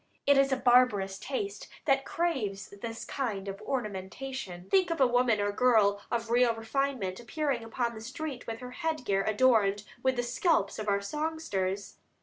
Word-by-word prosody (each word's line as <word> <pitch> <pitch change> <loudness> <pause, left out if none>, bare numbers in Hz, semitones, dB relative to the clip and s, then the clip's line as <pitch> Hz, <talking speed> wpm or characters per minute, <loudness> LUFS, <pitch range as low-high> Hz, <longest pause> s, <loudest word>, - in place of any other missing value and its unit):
It 285 - +6
is 275 0 +4
a 265 - +2
barbarous 235 -7 +3
taste 205 -7 -4 0.2
that 270 -2 +3
craves 215 - -2
this 225 -1 -5
kind 210 -8 -3
of 195 0 -6
ornamentation. 210 -3 -5
Think 370 -2 +4
of 330 - -2
a 265 - +6
woman 245 -3 +3
or 205 0 +1
girl 205 -3 +3
of 230 -1 -2
real 240 -1 +4
refinement 225 -4 -2
appearing 265 0 -2
upon 235 +1 -2
the 220 - -9
street 265 +2 -6
with 225 +1 -5
her 250 0 -7
head 320 -1 -3
gear 195 -2 +1
adorned 215 -3 +3 0.2
with 260 0 +2
the 245 - 0
scalps 240 - +1
of 215 -1 -2
our 200 0 +2
songsters! 205 -8 -3
235 Hz, 170 wpm, -30 LUFS, 200-270 Hz, 0.2 s, It